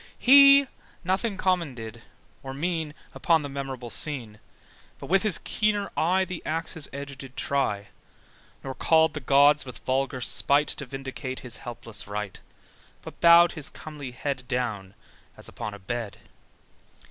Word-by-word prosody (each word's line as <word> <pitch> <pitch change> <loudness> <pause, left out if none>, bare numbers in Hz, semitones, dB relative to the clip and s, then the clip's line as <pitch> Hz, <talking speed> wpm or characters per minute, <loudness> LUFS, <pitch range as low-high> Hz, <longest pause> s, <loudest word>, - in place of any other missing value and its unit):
He 275 +1 +8 0.4
nothing 190 +3 -1
common 180 -8 0
did 115 0 -9 0.4
or 135 0 -7
mean 160 0 -2 0.2
Upon 165 -4 +2
that 145 - -5
memorable 135 -3 -6
scene: 120 -9 -4 0.6
But - - -9
with 195 0 +4
his 210 -5 0
keener 210 -1 0
eye 185 +3 +2
The 180 -2 -7
axe's 160 -1 -3
edge 140 0 -7
did 135 -2 -11
try: 105 -8 -1 0.7
Nor 135 - -5
called 160 +2 +3
the 150 - -4
gods 145 +1 +4
with 125 -2 -11
vulgar 130 0 -1
spite 140 +4 +3
To 140 - -5
vindicate 130 0 -6
his 125 -3 -3
helpless 115 -3 -7
right, 105 -1 -5 0.6
But - - -11
bowed 170 0 +7
his 155 -4 -7
comely 150 -4 -9
head, 125 0 -4
Down, 110 -6 -3 0.4
as - - -6
upon 105 -1 -6
a - - -9
bed. 105 +2 -5
140 Hz, 145 wpm, -26 LUFS, 125-165 Hz, 0.7 s, He